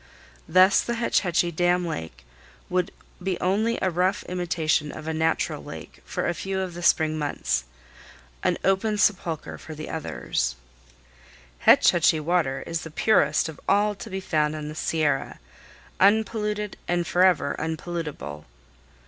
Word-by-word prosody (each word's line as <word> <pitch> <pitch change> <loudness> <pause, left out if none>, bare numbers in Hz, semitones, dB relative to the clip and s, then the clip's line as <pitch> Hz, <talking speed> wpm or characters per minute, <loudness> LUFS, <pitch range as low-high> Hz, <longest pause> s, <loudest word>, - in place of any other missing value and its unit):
Thus 185 +2 +5
the 235 - -3
Hetch 235 0 +2
Hetchy 175 -2 +1
dam 175 +2 +2
lake 80 - -6 0.5
would 180 +1 +1 0.3
be 185 -1 -2
only 215 +6 +1
a 185 - +2
rough 185 +4 +1
imitation 165 -4 0
of 155 0 -9
a 160 - -1
natural 160 +1 0
lake - - -10
for - - -2
a - - +1
few 190 +2 -3
of 185 -2 -3
the 175 - -7
spring 155 -2 +3
months, 145 - -1 0.8
an - - +1
open 200 +3 +1
sepulcher 180 -6 0
for 160 - -9
the 155 +1 -7
others. - - -2 1.0
"Hetch - - +6
Hetchy 165 -2 +3
water 155 -4 0
is 165 -1 -3
the 160 - -7
purest 155 -3 +2
of 160 -2 -9
all 205 +1 +3
to 200 - -9
be 190 - -3
found 155 -4 0
in 150 -1 -5
the - - -6
Sierra, 155 -3 -1 0.6
unpolluted, 210 0 +1
and 175 0 0
forever 175 -6 +3
unpollutable." 160 - -5
175 Hz, 150 wpm, -25 LUFS, 155-190 Hz, 1.0 s, Hetch